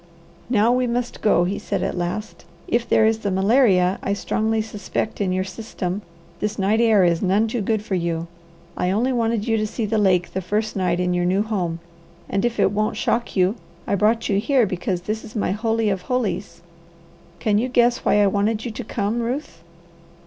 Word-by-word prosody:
"Now 230 -1 +3
we 250 0 +2
must 240 +1 -3
go," 210 -5 +4
he 190 +3 -2
said - - -2
at - - -2
last. 180 +5 -4 0.2
"If 235 0 0
there 220 - +4
is 220 0 +2
the 205 - -2
malaria 195 -2 +3
I 200 - -1
strongly 220 +2 0
suspect 215 0 -3
in 190 -2 +1
your 185 0 0
system, 190 -1 -5 0.4
this 210 +1 -2
night 210 +3 +2
air 220 -4 +5
is 170 -2 +2
none 200 +4 +2
too 230 +1 -2
good 215 +1 0
for 205 - -4
you. 170 -2 -1 0.5
I 180 - 0
only 235 +7 +1
wanted 230 -2 0
you 225 -1 +2
to 215 0 0
see 225 +1 -3
the 215 +1 0
lake 185 -3 +2
the 190 - -2
first 215 +4 -2
night 180 -2 0
in 180 0 +1
your 175 0 +1
new 190 +3 +2
home, 180 -6 -2 0.5
and 195 - -1
if 240 -1 -1
it - - +4
won't 215 +1 -1
shock 235 +1 -1
you, 190 +4 +2 0.3
I - - -1
brought 215 +4 +2
you 200 -1 +2
here 255 +2 +3
because 185 -1 -2
this 215 +4 -4
is 215 - -12
my 210 - 0
holy 225 +1 0
of 195 -2 -1
holies. 200 -6 -3 0.7
Can 210 -1 +1
you 250 +3 -1
guess 240 -1 +3
why 205 - +3
I - - +4
wanted 210 +3 0
you 240 - -3
to - - -6
come, 210 +2 -2
Ruth?" 240 - -4
210 Hz, 205 wpm, -22 LUFS, 190-225 Hz, 0.7 s, air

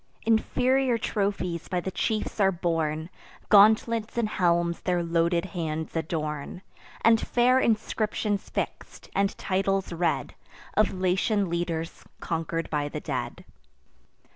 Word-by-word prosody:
Inferior 250 +3 +2
trophies 195 -6 -2
by 180 - -1
the 190 +2 -4
chiefs 215 +3 -2
are 195 -1 +4
borne; 165 -2 -2 0.4
Gauntlets 220 +2 +5
and 235 -2 +2
helms 170 -3 +1
their 180 -2 0
loaded 170 +1 +1
hands 160 -2 -3
adorn; 155 +1 -3 0.4
And 225 0 +5
fair 250 +2 +3
inscriptions 215 -3 0
fix'd, - - -5
and 200 0 0
titles 195 -1 0
read 170 0 -1 0.4
Of 215 -1 +3
Latian 190 +1 0
leaders 170 -1 -3 0.2
conquer'd 165 0 -2
by 145 -1 -1
the - - -5
dead. - - -4
185 Hz, 115 wpm, -27 LUFS, 170-215 Hz, 0.4 s, Gauntlets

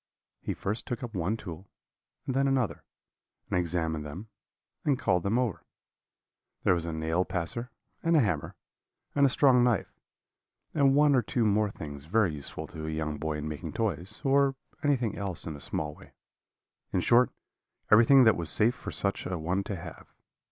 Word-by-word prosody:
"He - - -4
first 105 +4 -3
took 120 0 -4
up 120 -2 -6
one 95 +4 -1
tool 90 -2 -9 0.6
and 130 - -2
then 135 +1 +3
another, 130 -5 0 0.7
and - - +2
examined 80 -3 -1
them, 90 +9 -8 0.5
and 140 -3 +2
called 90 -8 +1
them 100 +6 0
over. 125 -7 -1 1.0
There - - +4
was 85 -1 -2
a - - -2
nail 80 +3 0
passer, 95 +8 -4 0.3
and 165 0 +2
a - - +6
hammer, 90 - 0 0.6
and 140 -1 +5
a - - +1
strong 125 -2 +5
knife, 120 -5 +1 0.8
and 140 -2 +4
one 145 0 +5
or 130 - +4
two 115 +1 0
more 105 0 +2
things 75 -6 -8
very 95 0 +2
useful 70 -2 -5
to 80 -1 -6
a - - -2
young 80 -1 -3
boy 75 0 -2
in 75 0 -4
making 75 -2 -5
toys, 95 -6 -3
or 140 -1 +3 0.3
anything 125 -8 +1
else 95 -4 -2
in 80 - -5
a - - -9
small 75 +1 -3
way; - - -17 0.8
in 90 - +1
short, 120 +6 +5 0.6
everything 120 +5 +7
that 110 -4 +6
was 85 -2 0
safe 115 +3 +4
for - - -8
such 100 0 -1
a 90 0 -2
one 90 +5 -1
to 100 - -3
have. 85 -3 -9
100 Hz, 180 wpm, -29 LUFS, 80-125 Hz, 1.0 s, everything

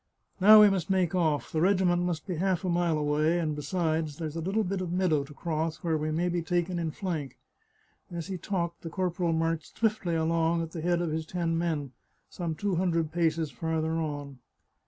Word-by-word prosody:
" - - -30
Now 215 +2 +10
we 210 - +8
must 190 -3 -2
make 185 -3 +2
oflf. 160 -5 0
The 155 - 0
regiment 180 -1 +3
must 175 -3 -2
be 180 -4 -3
half 185 0 0
a - - 0
mile 170 -2 +1
away; 150 +3 +1
and, 155 -3 -1
besides, 155 0 -1
there's 160 -2 -5
a 165 - -3
little 195 +6 0
bit 190 0 -2
of 180 -2 -3
meadow 175 -5 +2
to 150 - -13
cross, 160 0 -2
where 165 -2 +1
we 155 0 -1
may 165 +3 0
be 175 -1 0
taken 175 +1 -1
in 165 -1 -1
flank." 155 - -4 0.7
As 170 -2 -5
he 185 -2 -5
talked 170 -2 -3
the 165 - -6
corporal 175 -1 -1
marched 165 0 -1
swiftly 215 -6 0
along 165 +1 +1
at 165 - -7
the 165 - -5
head 175 +1 +1
of 165 - -2
his 160 0 -3
ten 170 -2 -1
men, 160 -5 -1 0.4
some 170 -3 -3
two 195 +1 -1
hundred 165 -3 0
paces 165 -2 0
farther 160 +4 -2
on. 145 -4 -4
165 Hz, 210 wpm, -28 LUFS, 160-180 Hz, 0.7 s, Now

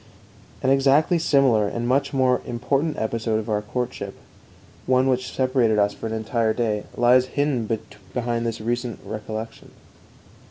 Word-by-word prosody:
An 130 - +3
exactly 140 +5 +4
similar 135 -9 +3
and 120 +3 -3
much 135 +3 +1
more 130 -2 +2
important 135 +6 -1
episode 110 0 -1
of 110 0 -3
our 105 0 +1
courtship, 105 -2 -4 0.7
one 130 +1 +3
which 130 -1 0
separated 130 -4 +2
us 105 0 +2
for - - -6
an 110 - -4
entire 110 0 0
day, 110 -3 -1
lies 125 +1 +5
hidden 140 -6 0 0.4
behind 120 -1 -1
this 115 -1 -3
recent 120 +1 -3
recollection. 110 +1 -6
120 Hz, 145 wpm, -23 LUFS, 110-130 Hz, 0.7 s, lies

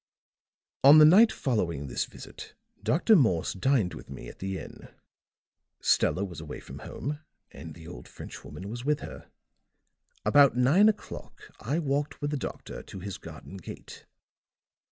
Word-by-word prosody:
"On 140 +3 +9
the 155 - +9
night 210 +8 +7
following 85 - -1
this 65 - -2
visit, - - -11 0.3
Dr. 195 +7 +4
Morse 110 - +2
dined 105 -2 +1
with - - -11
me - - -8
at - - -14
the 95 0 -3
inn; - - -10 0.9
Stella 100 - +2
was 85 -5 -8
away 75 -2 -7
from - - -10
home 145 +2 -5 0.3
and 75 +2 -10
the 80 -1 -12
old 90 - -10
French - - -10
woman 75 +7 -9
was 120 +3 -6
with 150 +1 0
her. - - -9 1.0
About 140 -4 +5
nine 155 +13 +5
o'clock 210 - -6 0.2
I 135 +8 -2
walked 145 -2 -1
with 145 0 -2
the 150 - -1
doctor - - -6
to 95 - -10
his 95 +1 -6
garden 95 - -10
gate. 95 - -11
120 Hz, 155 wpm, -28 LUFS, 90-145 Hz, 1.0 s, On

